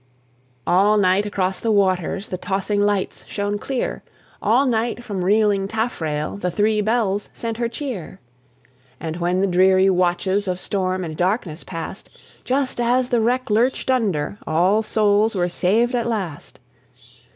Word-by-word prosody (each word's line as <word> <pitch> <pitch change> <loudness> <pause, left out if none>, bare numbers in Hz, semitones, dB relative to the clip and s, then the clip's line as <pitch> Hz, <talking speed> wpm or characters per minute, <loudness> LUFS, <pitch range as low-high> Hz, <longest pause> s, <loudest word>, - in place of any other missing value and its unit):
All 205 +4 +4
night 195 +1 +3
across 190 -2 -1
the 225 - 0
waters 195 -1 +1
The 185 - -3
tossing 200 +2 -1
lights 205 -2 0
shone 205 0 -2
clear; 265 +1 -3 0.4
All 235 +7 +3
night 240 -1 -1
from 200 -6 -3
reeling 205 0 +2
taffrail 170 -8 -2
The 180 -3 -2
Three 210 +3 +1
Bells 210 -2 0
sent 230 -1 -4
her 235 -1 -1
cheer. 230 - -6 0.8
And 160 0 -4
when 180 +1 0
the - - +3
dreary 190 +1 +4
watches 185 +2 +1
Of 180 -1 -2
storm 185 -1 -2
and 160 -2 -5
darkness 180 -1 -1
passed, 165 +2 -7 0.3
Just 260 -1 -1
as 250 +1 +2
the 240 -2 +2
wreck 245 +1 0
lurched 245 +4 +1
under, 200 -7 0
All 180 +7 +3
souls 215 0 +2
were 175 -2 +1
saved 220 +8 +1
at 235 -1 0
last. 190 -10 -4
200 Hz, 150 wpm, -21 LUFS, 185-225 Hz, 0.8 s, All